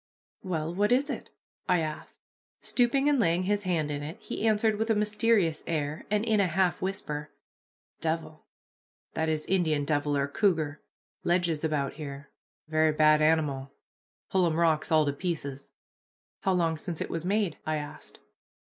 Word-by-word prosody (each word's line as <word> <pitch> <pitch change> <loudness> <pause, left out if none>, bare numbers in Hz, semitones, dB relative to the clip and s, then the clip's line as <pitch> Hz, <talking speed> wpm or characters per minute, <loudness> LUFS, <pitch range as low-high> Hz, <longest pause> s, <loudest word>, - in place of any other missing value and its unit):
"Well, 165 -4 -2
what 205 +4 +1
is 275 +4 +3
it?" - - -6 0.4
I 180 -2 +4
asked. 155 -1 -6 0.4
Stooping 265 +3 +2
and 290 -2 +3
laying 175 -4 +2
his 205 +2 +1
hand 165 -6 0
in 145 0 -3
it, 155 +4 -6
he 225 - -3
answered 215 0 +2
with 225 +1 0
a 225 - +4
mysterious 210 -5 +2
air, 150 -2 -2
and 210 +1 +1
in 220 -2 +2
a 195 - +4
half 180 +1 +1
whisper, 150 -6 -3 0.7
"Devil 160 -1 -3 0.7
[that 160 0 0
is, 155 -1 -1
Indian 160 -6 +1
devil, 145 0 +1
or 140 0 +1
cougar] 155 -3 0 0.4
ledges 175 -3 +1
about 150 -3 0
here 140 -2 -8 0.4
very 155 0 +3
bad 155 0 +5
animal 150 -4 +1 0.6
pull 185 -2 +3
'em 160 - 0
rocks 160 -2 +2
all 155 -1 +5
to 145 - 0
pieces." 140 -5 -5 0.6
"How 190 - +1
long 165 -3 +1
since 170 -1 -5
it - - -4
was 165 -1 -3
made?" 200 -2 0
I 155 - -1
asked. 145 -1 -7
165 Hz, 165 wpm, -28 LUFS, 150-190 Hz, 0.7 s, bad